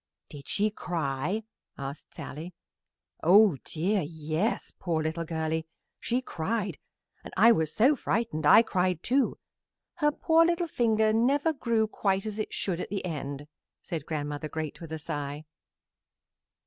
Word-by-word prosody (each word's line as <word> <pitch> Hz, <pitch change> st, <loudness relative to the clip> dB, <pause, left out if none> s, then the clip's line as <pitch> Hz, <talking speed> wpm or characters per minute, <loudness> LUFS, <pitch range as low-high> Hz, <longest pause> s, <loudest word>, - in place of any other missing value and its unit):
"Did 140 Hz, -1 st, -11 dB
she 210 Hz, +1 st, +1 dB
cry?" 165 Hz, +2 st, -2 dB, 0.3 s
asked 140 Hz, +2 st, -7 dB
Sallie. 165 Hz, +5 st, -7 dB, 0.7 s
"Oh 195 Hz, -1 st, +6 dB
dear, 190 Hz, +6 st, 0 dB
yes, 160 Hz, -, -2 dB
poor 165 Hz, -3 st, -1 dB
little 160 Hz, +2 st, -2 dB
girlie; 160 Hz, 0 st, -2 dB, 0.3 s
she 250 Hz, +2 st, -1 dB
cried, 195 Hz, -, -2 dB, 0.4 s
and -, -, -9 dB
I 225 Hz, +5 st, +8 dB
was 160 Hz, -7 st, +2 dB
so 260 Hz, -, +4 dB
frightened 225 Hz, -, -1 dB
I 220 Hz, -, +9 dB
cried, 180 Hz, -5 st, 0 dB
too. 265 Hz, +2 st, +2 dB, 0.6 s
Her 295 Hz, -3 st, +3 dB
poor 325 Hz, +2 st, +4 dB
little 340 Hz, +1 st, +1 dB
finger 220 Hz, -6 st, +2 dB
never 280 Hz, +8 st, +2 dB
grew 235 Hz, -5 st, +1 dB
quite 195 Hz, -2 st, 0 dB
as 215 Hz, 0 st, -4 dB
it 215 Hz, -, -3 dB
should 180 Hz, -3 st, -2 dB
at -, -, -4 dB
the 195 Hz, -1 st, -3 dB
end," 145 Hz, -4 st, -4 dB, 0.4 s
said 165 Hz, -5 st, -5 dB
Grandmother 150 Hz, 0 st, -3 dB
Great, 155 Hz, +1 st, -5 dB
with 165 Hz, -2 st, -8 dB
a 160 Hz, -, -2 dB
sigh. 145 Hz, 0 st, -5 dB
180 Hz, 145 wpm, -28 LUFS, 155-220 Hz, 0.7 s, I